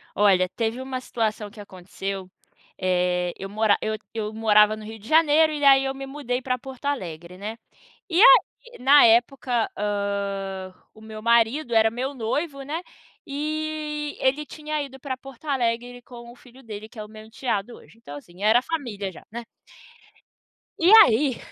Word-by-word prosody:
Olha, 190 -3 +4
teve 230 +1 -2
uma 260 -1 -5
situação 220 -4 -3
que 210 +1 -16
aconteceu, 190 0 -7 0.5
eh, 180 -1 0
eu 195 - -7
mora 210 0 +2
eu 220 0 -2 0.2
eu 215 -2 -3
morava 215 -1 +4
no 215 - -10
Rio 220 +1 -9
de 210 - -14
Janeiro 315 0 +4
e 295 -1 -4
aí 270 -1 +6
eu 270 0 -2
me 270 0 -7
mudei 270 -3 -3
para 255 -1 -2
Porto 265 +2 -11
Alegre, 175 - -4
né, 215 +4 -6 0.5
e 350 +2 +3
a - - +10 0.5
na 280 +3 +7
época, 240 0 +2
ah, 200 -2 -3 0.2
o 220 - -17
meu 220 0 -9
marido 235 +4 +2
era 220 0 +5
meu 255 +4 -4
noivo, 275 +4 -3
né, 300 +5 -4 0.5
e 300 0 -4
ele 275 +3 +1
tinha 305 0 -4
ido 265 -1 -10
para 265 -2 -4
Porto 270 +2 -14
Alegre 245 -2 -1
com 235 -1 -12
o - - -15
filho 250 +1 -18
dele 215 -2 -8
que 220 - -19
é - - -4
o - - -11
meu 215 0 -12
enteado 225 -1 -3
hoje, - - -18
então 145 -11 -11
assim 175 +6 -15
era 220 +3 +5
a - - -8
família 240 -10 -4
já, 170 - -15
né. 235 +2 -6 1.3
E 345 +4 +4
aí, 255 +2 +1
235 Hz, 175 wpm, -24 LUFS, 210-270 Hz, 1.3 s, a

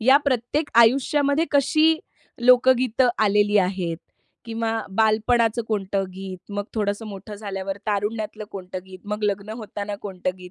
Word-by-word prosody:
या 260 +5 +6
प्रत्येक 275 +3 0
आयुष्यामध्ये 280 +5 +4
कशी 310 +3 +4 0.4
लोकगीतं 250 0 +4 0.2
आलेली 205 0 +3
आहेत 180 -3 0 0.5
किंवा 225 -1 -2 0.2
बालपणाचं 225 +1 +2
कोणतं 195 -2 -1
गीत, 190 -1 -7
मग 205 0 -2
थोडंसं 210 +1 -1
मोठं 205 +1 -8
झाल्यावर 195 -2 -5
तारुण्यातलं 215 +1 -2
कोणतं 185 -1 -6
गीत, 185 -1 -11
मग 210 +1 -4
लग्न 200 +1 -1
होताना 205 -2 -5
कोणतं 185 -2 -3
गीत? 180 0 -11
215 Hz, 130 wpm, -23 LUFS, 195-240 Hz, 0.5 s, या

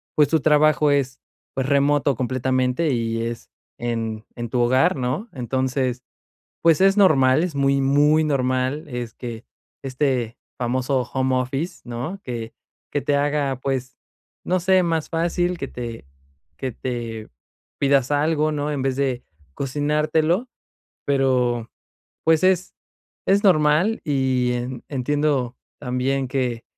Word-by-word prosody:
pues, 150 -1 +5
tu 160 - +3
trabajo 150 0 +4
es 135 -2 0 0.3
pues 135 -1 -2
remoto 140 0 +2
completamente 130 +4 0
y 115 -2 -1
es 115 0 -5 0.3
en 115 -2 -3
en 120 -1 -5
tu 125 - -1
hogar, 130 +2 +3
¿no?, 130 - -2
entonces 130 0 -1 0.6
pues, 165 +1 +4
es 195 +1 +5
normal. 155 -6 +5
Es 180 - -2
muy 140 0 +2
muy 145 +3 +4
normal, 130 +1 0
es 120 -3 -5
que 120 -2 -7 0.4
este 130 -4 -1 0.2
famoso 130 +2 0
home 130 -1 +1
office, 135 +7 -3
¿no?, 125 +11 -5
que 115 -2 -5 0.4
que 145 - -1
te 145 +1 +1
haga, 145 -2 0
pues, 130 -1 -3 0.5
no 185 +1 +1
sé 185 +1 +4
más 165 -2 -1
fácil 175 +2 0
que 140 - -4
te 120 - -7 0.5
que 130 -1 -3
te 115 -3 -5 0.5
pidas 140 -1 +2
algo, 155 +1 +2
¿no?, 150 0 -2
en 140 -3 -2
vez 135 -1 0
de 130 -3 -1 0.3
cocinártelo, 155 - 0 0.6
pero 125 -4 +1 0.6
pues 160 0 +4
es, 185 -1 +2 0.5
es 200 +2 +3
normal 175 +4 +3
y 130 -3 +1
en 125 +1 -5
entiendo 140 -2 0 0.2
también 130 +2 -1
que 125 -3 -2
135 Hz, 130 wpm, -22 LUFS, 125-150 Hz, 0.6 s, pues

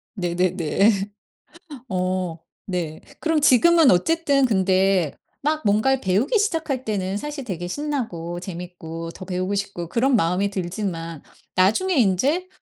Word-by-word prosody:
네네네. 180 +2 +2 1.0
어 185 -3 -2 0.3
네. 170 -5 -3 0.2
그럼 320 -2 +1
지금은 310 +2 +6
어쨌든 280 - +3
근데 190 - +2 0.3
막 310 +1 0
뭔가를 255 +6 +3
배우기 210 - +1
시작할 320 - -1
때는 195 -2 -2
사실 295 +2 -5
되게 175 -5 -4
신나고 220 - -3
재밌고 170 -2 -7
더 185 - -9
배우고 185 +2 -2
싶고 195 -4 -4
그런 255 +5 +2
마음이 185 +2 +1
들지만 175 -4 -4 0.3
나중에 220 - +3
인제 265 - +2
195 Hz, 265 characters per minute, -23 LUFS, 180-270 Hz, 1.0 s, 지금은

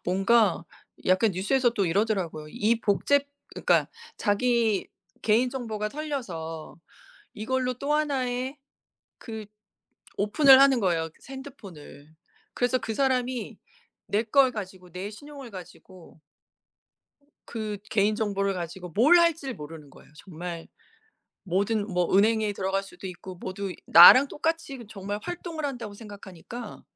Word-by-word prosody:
뭔가 195 0 +3 0.4
약간 185 +4 +3
뉴스에서 240 +7 +1
또 200 -5 -1
이러더라고요. 180 -5 -1
이 225 +7 0
복제 260 +7 +2 0.3
그러니까 - - +2 0.3
자기 225 0 +1 0.3
개인 230 +4 +2
정보가 220 -5 -4
털려서 195 - -6 0.6
이걸로 255 +3 -1
또 280 +4 -1
하나의 265 -3 -1 0.6
그 220 -3 -8 0.7
오픈을 265 +7 +6
하는 270 -3 +5
거예요 165 -5 0 0.2
핸드폰을. 195 - -11 0.4
그래서 250 +1 +1
그 225 - -4
사람이 255 -1 -1 0.5
내 210 +3 +1
걸 260 +3 +4
가지고 185 -4 -8
내 185 +4 -5
신용을 280 +2 -11
가지고 180 -3 -13 1.3
그 215 -3 -5
개인 210 0 +2
정보를 200 -3 -1
가지고 175 0 -6
뭘 285 - +5
할지를 330 -6 +1
모르는 150 -1 -10
거예요. - - -18
정말 170 0 -8 0.8
모든 200 +3 0
뭐 180 0 +1
은행에 215 0 +3
들어갈 195 0 -1
수도 195 0 -11
있고 185 0 -9
모두 190 +1 -5
나랑 255 +12 +9
똑같이 295 -5 -3
정말 205 0 -5
활동을 340 -2 -6
한다고 240 -7 -5
생각하니까 205 +1 -10
215 Hz, 280 characters per minute, -26 LUFS, 185-255 Hz, 1.3 s, 나랑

